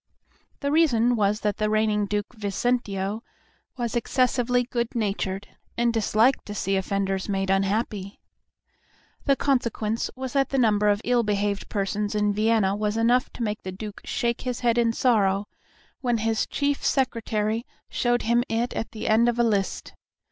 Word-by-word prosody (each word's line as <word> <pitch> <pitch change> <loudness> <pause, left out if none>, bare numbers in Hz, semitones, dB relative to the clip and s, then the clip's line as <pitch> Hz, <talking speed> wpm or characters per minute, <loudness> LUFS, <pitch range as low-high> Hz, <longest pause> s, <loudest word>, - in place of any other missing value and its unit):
The 280 -1 0
reason 245 -7 +3
was 210 -1 +1
that 210 -2 -1
the 215 0 0
reigning 215 -1 +1
Duke 205 +3 -2
Vicentio 205 -1 -1 0.6
was 240 -2 -2
excessively 245 0 +1
good 235 -1 -3
natured, 195 -3 -2 0.3
and 235 0 +2
disliked 225 +3 +2
to 205 - -6
see 195 -1 0
offenders 195 0 -1
made 195 -1 0
unhappy. 195 0 -1 1.1
The 275 - +4
consequence 235 -5 0
was 260 -1 -5
that 275 -2 +2
the 270 - -1
number 210 -4 +3
of 205 0 +1
ill 245 0 +3
behaved 205 -2 -1
persons 205 +1 -2
in 210 -1 +2
Vienna 215 -2 +2
was 210 +1 -1
enough 240 +2 +2
to 240 - -4
make 210 -1 -2
the 185 - -6
Duke 205 +2 -8
shake 235 0 -1
his 250 -2 -3
head 240 -1 +2
in 230 -1 +3
sorrow 205 -5 +2 0.5
when 245 -3 0
his 225 0 0
chief 285 -1 -1
secretary 230 -3 0 0.2
showed 240 0 0
him 235 +2 +2
it 230 +2 -1
at 225 - -4
the 220 0 -5
end 230 +2 +4
of 240 - -1
a 240 - +3
list. 205 -4 -1
220 Hz, 160 wpm, -25 LUFS, 205-240 Hz, 1.1 s, The